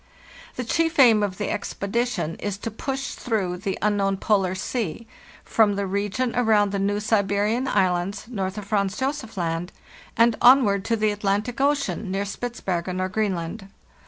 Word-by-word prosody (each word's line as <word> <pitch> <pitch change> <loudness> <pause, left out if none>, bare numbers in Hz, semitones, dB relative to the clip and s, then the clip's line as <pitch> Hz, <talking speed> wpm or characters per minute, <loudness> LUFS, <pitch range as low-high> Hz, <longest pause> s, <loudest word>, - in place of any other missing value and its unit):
" - - -19
The 250 - -3
chief 325 +7 0
aim 235 -6 +7
of 195 -3 -2
the 210 - -2
expedition 200 -4 -2
is 205 -1 -3
to 230 +2 -5
push 270 +4 -4
through 195 -7 -2
the 195 +1 -3
unknown 200 -2 +1
Polar 190 -3 +1
Sea 215 0 -3 0.4
from 210 -3 +3
the 200 0 -1
region 200 +5 -1
around 215 -4 +3
the 200 - -1
New 200 +1 0
Siberian 210 +3 +1
Islands, 190 -1 0
north 195 -4 -3
of 210 - -5
Franz 200 -1 0
Josef 265 -5 -3
Land, 170 0 -2 0.5
and 230 0 +5
on 260 +2 +8
ward 200 -1 0
to 230 - +1
the 215 -1 +1
Atlantic 205 +4 -1
Ocean, 280 -7 0
near 195 +2 -1
Spitzbergen 190 -5 -3
or 185 0 -1
Green 205 0 0
land. 170 +4 -6
205 Hz, 170 wpm, -24 LUFS, 195-230 Hz, 0.5 s, on